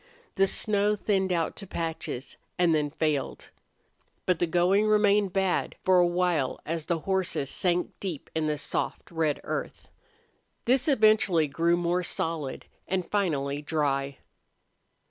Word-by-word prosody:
The 195 - +3
snow 210 +1 +2
thinned 195 -2 0
out 170 -2 0
to 200 - -9
patches, 160 -7 -4 0.2
and 175 -2 +3
then 150 -2 +1
failed. 150 -2 -2 0.7
But 180 - +1
the 175 - +1
going 180 +5 +3
remained 210 -2 +3
bad 190 -1 0
for 185 -1 +5
a 175 - +5
while 175 -6 0
as 165 -1 -3
the 170 -3 -1
horses 190 -7 -1
sank 180 -1 0
deep 180 -7 -5
in 160 -1 0
a 150 - -1
soft 145 - -3
red 160 -3 0
earth. - - -5 0.7
This 255 +3 +2
eventually 215 - +4
grew 170 +4 +1
more 175 +1 0
solid 160 -5 -3 0.2
and 185 -1 -2
finally 145 -8 0
dry. 140 -3 -1
175 Hz, 140 wpm, -27 LUFS, 155-195 Hz, 0.7 s, for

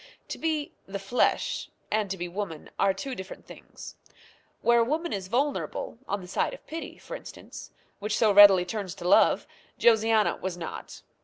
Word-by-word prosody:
To - - -5
be 310 -2 -1 0.2
"the 195 +1 -4
flesh" 195 +6 0 0.2
and 210 -2 +1
to 190 - -3
be 175 0 -4
woman 175 -4 -6
are 195 - +4
two 195 +8 -5
different 190 -5 -8
things. - - -12 0.6
Where 235 0 +4
a - - +5
woman 315 +7 -1
is 190 -2 -4
vulnerable, 255 0 -2
on 200 0 -2
the 180 - -10
side 195 - -1
of - - -18
pity, 325 +1 -7
for - - -8
instance, - - -10 0.3
which 210 +1 -1
so 220 -3 +4
readily 200 -3 +8
turns 190 -1 -4
to 175 -2 -5
love, - - +5 0.3
Josiana 220 -2 +3
was 185 -2 -3
not. 165 - -8
205 Hz, 175 wpm, -27 LUFS, 190-235 Hz, 0.6 s, readily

